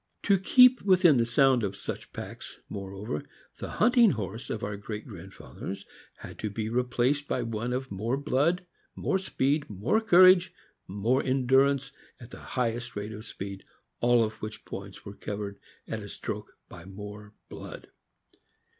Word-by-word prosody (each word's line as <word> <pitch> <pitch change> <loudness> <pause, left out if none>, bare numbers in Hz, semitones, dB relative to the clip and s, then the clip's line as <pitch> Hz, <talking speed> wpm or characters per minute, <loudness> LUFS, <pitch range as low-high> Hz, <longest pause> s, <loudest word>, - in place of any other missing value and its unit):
To 200 -2 +4
keep 250 +6 +6
within 175 -10 +5
sound 130 +1 +4
of 100 -1 -2
such - - -6
packs, - - -8
moreover, 100 -4 -5 0.4
the - - -5
hunting 235 -2 +4
horse 110 +3 -5
of 110 - -3
our 105 -2 -3
great 105 +1 -6
grandfathers 95 -4 -8 0.3
had - - -11
to 110 - -2
be 110 +1 -3
replaced 125 +4 +1
by 125 - -1
one 115 +1 -3
of 130 +1 -3
more 110 +7 -1
blood, 155 +6 +1 0.3
more 190 - 0
speed, 145 -5 0
more 105 - +1
courage, 185 -3 +6 0.3
more 110 +8 +1
endurance 135 +1 +3 0.3
at 120 0 -12
the - - -9
.highest 120 -1 -2
rate 105 +1 -4
of 110 +1 -9
speed 100 0 -7 0.2
— - - -46
all 120 -1 +5
of 110 0 -4
which 110 0 -7
points 100 0 -8
were 100 - -7
covered 100 -1 -5 0.3
at - - -3
a - - -9
stroke - - -6
by 85 - -11
more 105 +2 -10
blood. - - -9
120 Hz, 155 wpm, -28 LUFS, 105-140 Hz, 0.4 s, keep